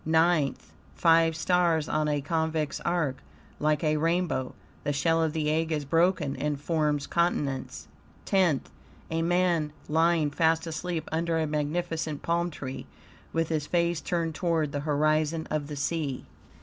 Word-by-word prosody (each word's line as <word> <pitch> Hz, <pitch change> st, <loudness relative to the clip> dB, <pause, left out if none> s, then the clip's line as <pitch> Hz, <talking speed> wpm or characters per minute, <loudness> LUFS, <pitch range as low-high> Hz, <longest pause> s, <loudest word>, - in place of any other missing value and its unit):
NINTH 160 Hz, -2 st, +1 dB, 0.2 s
Five 165 Hz, -1 st, +4 dB
stars 170 Hz, -2 st, +2 dB
on 155 Hz, 0 st, 0 dB
a 145 Hz, -1 st, 0 dB
convex 160 Hz, 0 st, -1 dB
arc, 165 Hz, -6 st, 0 dB, 0.4 s
like 150 Hz, 0 st, +1 dB
a 155 Hz, -1 st, +2 dB
rainbow; 165 Hz, -4 st, 0 dB, 0.3 s
the 145 Hz, -, 0 dB
shell 165 Hz, +4 st, +2 dB
of 160 Hz, -1 st, +1 dB
the 155 Hz, -2 st, 0 dB
egg 160 Hz, +1 st, 0 dB
is 150 Hz, -2 st, -1 dB
broken 165 Hz, -1 st, +2 dB
and 150 Hz, -1 st, -2 dB
forms 150 Hz, -2 st, 0 dB
continents. 150 Hz, -6 st, -1 dB, 0.4 s
TENTH 180 Hz, -8 st, +2 dB, 0.4 s
A 165 Hz, 0 st, 0 dB
man 170 Hz, -3 st, +1 dB, 0.2 s
lying 160 Hz, -1 st, +2 dB
fast 160 Hz, +2 st, +2 dB
asleep 165 Hz, 0 st, -3 dB
under 165 Hz, +1 st, 0 dB
a 160 Hz, -, +1 dB
magnificent 155 Hz, 0 st, -2 dB
palm 170 Hz, +1 st, +1 dB
tree, 135 Hz, -4 st, -7 dB, 0.4 s
with 165 Hz, -1 st, 0 dB
his 155 Hz, -3 st, -1 dB
face 170 Hz, -2 st, +1 dB
turned 165 Hz, +2 st, -1 dB
toward 160 Hz, -3 st, 0 dB
the 145 Hz, -, -2 dB
horizon 155 Hz, +2 st, +1 dB
of 150 Hz, -2 st, -1 dB
the 150 Hz, -, -6 dB
sea. 145 Hz, -2 st, -2 dB
160 Hz, 150 wpm, -28 LUFS, 150-170 Hz, 0.4 s, Five